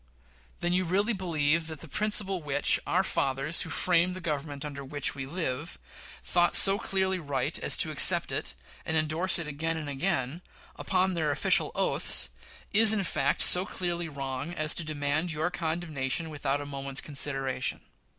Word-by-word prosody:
Then 175 0 0
you 185 +1 +2
really 200 +6 +1
believe 165 -4 0
that 160 -3 -8
the - - -9
principle 195 +1 -1
which 145 -2 0
"our 185 +2 +1
fathers 135 -1 -1
who 165 - -3
framed 180 +3 +1
the - - -5
Government 150 -3 -4
under 140 -1 -7
which 140 0 -3
we 135 -2 -6
live" 155 -1 -4 0.5
thought 175 -1 +2
so 195 +1 +9
clearly 190 -3 -1
right 140 -5 -3
as - - +1
to - - +1
adopt - - +4
it, - - -4 0.3
and 160 - -1
indorse 160 +4 0
it 170 -3 -4
again 160 +2 -3
and 155 -2 -6
again, 145 0 -2 0.3
upon 185 0 0
their 160 -3 -1
official 145 - +2
oaths, - - 0 0.4
is 220 +1 +7
in 205 -2 0
fact 180 - 0
so 180 - +8
clearly 175 -3 -3
wrong 140 +3 -5
as 155 0 -1
to 170 - -4
demand 155 +2 -2
your 155 +3 -2
condemnation 160 -3 -3
without 145 -1 -2
a - - -7
moment's 140 -1 -4
consideration. 135 -3 -3
160 Hz, 170 wpm, -28 LUFS, 145-180 Hz, 0.5 s, so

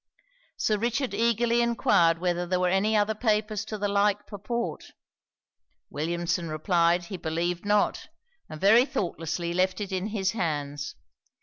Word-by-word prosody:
Sir 215 -1 +1
Richard 240 +4 -1
eagerly 235 +1 +2
enquired 175 -8 +3
whether 175 0 -1
there 185 0 0
were 180 0 +2
any 205 +4 +2
other 210 +1 +2
papers 215 -2 0
to 215 0 -5
the 205 0 -1
like 205 0 +1
purport. 235 +3 -4 1.1
Williamson 170 +2 -2
replied, 170 +2 +2
he 185 +2 -7
believed 170 +2 -2
not; 205 0 +1 0.4
and 155 - -8
very 220 +7 +6
thoughtlessly 170 - -3
left 185 +2 +1
it 205 -2 -4
in 190 +1 -2
his 200 -3 -1
hands. 145 -7 -3
190 Hz, 140 wpm, -27 LUFS, 170-215 Hz, 1.1 s, very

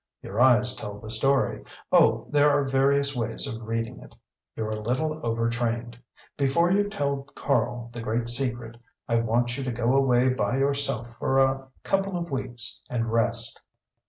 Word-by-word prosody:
Your 105 +5 -3
eyes 125 -1 +4
tell 105 -4 -7
the 110 +1 -8
story; 135 +5 +1 0.3
oh - - +4
there 145 0 +4
are 145 0 +2
various 140 +1 +2
ways 115 +1 -1
of 115 -4 -5
reading 115 0 -3
it. - - -15 0.4
You're 110 -1 -3
a 110 0 -4
little 155 +8 -2
overtrained. 115 0 -2 0.4
Before 145 +6 +2
you 205 +1 +2
tell 140 -8 -2
Karl 120 -4 -1
the 120 - -6
great 115 +1 -2
secret 120 -2 -3 0.3
I 115 - +1
want 120 +3 0
you - - -3
to 130 - -2
go 120 +1 0
away 130 -2 +3
by 130 0 0
yourself 135 -4 +1
for 135 - 0
a 135 0 +2 0.2
couple 195 -1 0
of 170 -2 -5
weeks 130 -3 -1
and 115 -2 -2
rest." 115 0 +4
125 Hz, 165 wpm, -26 LUFS, 115-135 Hz, 0.4 s, eyes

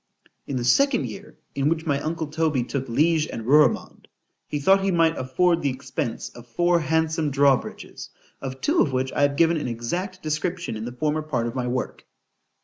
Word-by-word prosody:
In 140 - -3
the 120 - -2
second 275 - +3
year, 200 +2 -9 0.2
in 140 +1 +1
which 160 0 -1
my 140 -3 +1
uncle 160 +1 -2
Toby 155 -3 0
took 135 +1 -4
Liege 155 +5 +2
and 115 - -6
Ruremond, 150 +4 +2 0.4
he 150 - -3
thought 195 +7 +4
he 195 - +1
might 165 -2 +3
afford 170 +7 +1
the 140 - +1
expence 130 -1 -4
of 120 0 -14
four 175 +8 +2
handsome 160 0 0
draw 140 0 +5
bridges; - - -8 0.3
of 130 -1 -6
two 315 +4 +2
of 140 - +1
which 130 +1 -1
I - - 0
have 140 0 +3
given 165 +2 +3
an 150 - -3
exact 175 +12 -4
description 170 -1 -2
in 110 +1 -5
the 120 - -5
former 150 +5 -1
part 135 -7 -2
of 120 - -3
my 125 -1 -2
work. 125 +1 -4
150 Hz, 200 wpm, -24 LUFS, 130-165 Hz, 0.4 s, draw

